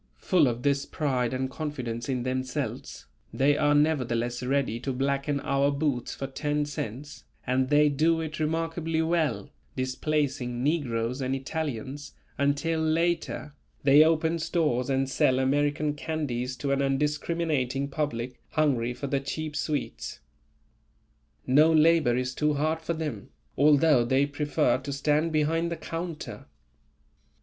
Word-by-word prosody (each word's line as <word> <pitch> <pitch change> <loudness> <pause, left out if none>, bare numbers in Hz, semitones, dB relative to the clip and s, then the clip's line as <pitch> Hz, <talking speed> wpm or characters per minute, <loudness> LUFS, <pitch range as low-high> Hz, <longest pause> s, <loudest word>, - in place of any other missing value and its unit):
Full 175 -6 +3
of 120 0 -2
this 140 -1 +1
pride 130 -5 -1
and 130 0 -1
confidence 130 -5 -5
in 125 -2 -1
themselves, 130 0 -4 0.3
they 140 +2 +3
are 145 0 +3
nevertheless 120 -6 +1
ready 130 -3 0
to 135 +2 -3
blacken 140 +2 -1
our 140 +1 +2
boots 140 -4 -1
for 135 - -4
ten 145 +2 -1
cents, 145 0 -6 0.2
and 130 +1 +1
they 150 0 +5
do 160 +3 +2
it 155 -1 -5
remarkably 165 +1 -1
well, 160 -3 0 0.2
displacing 130 -2 -1
negroes 130 -5 -1
and 130 +1 -1
Italians, 140 -1 -4 0.3
until 145 +3 +1
later, 160 -2 0 0.3
they 140 +2 +7
open 160 +1 +2
stores 155 -6 0
and 135 0 +1
sell 130 -1 +2
American 145 +3 +1
candies 130 -5 -3
to 140 +2 -2
an 140 0 +1
undiscriminating 145 -1 0
public, 130 -4 -3
hungry 125 -6 +1
for 140 - -5
the 140 0 0
cheap 150 +2 -5
sweets. 150 -2 -3 1.3
No 150 +5 +5
labour 155 -5 +4
is 125 0 -2
too 150 +2 +1
hard 155 +3 0
for 165 +1 -2
them, 150 -10 -5 0.3
although 145 -2 +5
they 130 +4 +2
prefer 145 -3 0
to 140 +1 -6
stand 150 +3 +1
behind 165 +2 +1
the 170 - -3
counter. 165 -1 -6
145 Hz, 135 wpm, -27 LUFS, 130-155 Hz, 1.3 s, they